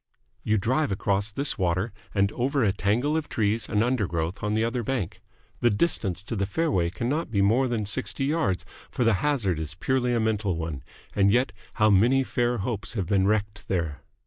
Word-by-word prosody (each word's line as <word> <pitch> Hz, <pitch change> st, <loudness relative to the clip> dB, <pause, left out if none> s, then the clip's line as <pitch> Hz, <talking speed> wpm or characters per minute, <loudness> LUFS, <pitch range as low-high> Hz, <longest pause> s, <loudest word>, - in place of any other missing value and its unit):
You 110 Hz, 0 st, +2 dB
drive 125 Hz, +6 st, +1 dB
across 100 Hz, +2 st, 0 dB
this 135 Hz, 0 st, 0 dB
water 95 Hz, +4 st, 0 dB, 0.2 s
and 100 Hz, 0 st, +3 dB
over 135 Hz, +3 st, 0 dB
a 100 Hz, -, +3 dB
tangle 115 Hz, +10 st, +1 dB
of 160 Hz, -2 st, -2 dB
trees 110 Hz, 0 st, 0 dB
and 105 Hz, +1 st, +2 dB
under 120 Hz, -5 st, +1 dB
growth 85 Hz, +3 st, -3 dB
on 105 Hz, +1 st, 0 dB
the 110 Hz, -, +2 dB
other 120 Hz, +2 st, -1 dB
bank. 120 Hz, -5 st, -3 dB, 0.4 s
The 120 Hz, -, +4 dB
distance 100 Hz, -, 0 dB
to 115 Hz, -, -4 dB
the 100 Hz, -2 st, -1 dB
fairway 100 Hz, -, +1 dB
cannot 125 Hz, -, -2 dB
be 100 Hz, -4 st, +2 dB
more 120 Hz, +6 st, +3 dB
than 115 Hz, -4 st, -1 dB
sixty 130 Hz, +5 st, -2 dB
yards, 135 Hz, -, 0 dB, 0.2 s
for -, -, -1 dB
the 115 Hz, -1 st, +4 dB
hazard 120 Hz, -, +1 dB
is 75 Hz, -1 st, -5 dB
purely 125 Hz, +5 st, 0 dB
a -, -, +2 dB
mental 105 Hz, -5 st, 0 dB
one, 80 Hz, -4 st, -4 dB, 0.3 s
and 100 Hz, 0 st, +4 dB
yet 125 Hz, +6 st, +2 dB, 0.2 s
how 110 Hz, -1 st, +4 dB
many 120 Hz, +8 st, +4 dB
fair 120 Hz, -1 st, 0 dB
hopes 110 Hz, 0 st, -3 dB
have 100 Hz, -5 st, -1 dB
been 95 Hz, +1 st, +2 dB
wrecked 105 Hz, 0 st, -1 dB
there! 80 Hz, -5 st, -2 dB
110 Hz, 200 wpm, -26 LUFS, 100-125 Hz, 0.4 s, The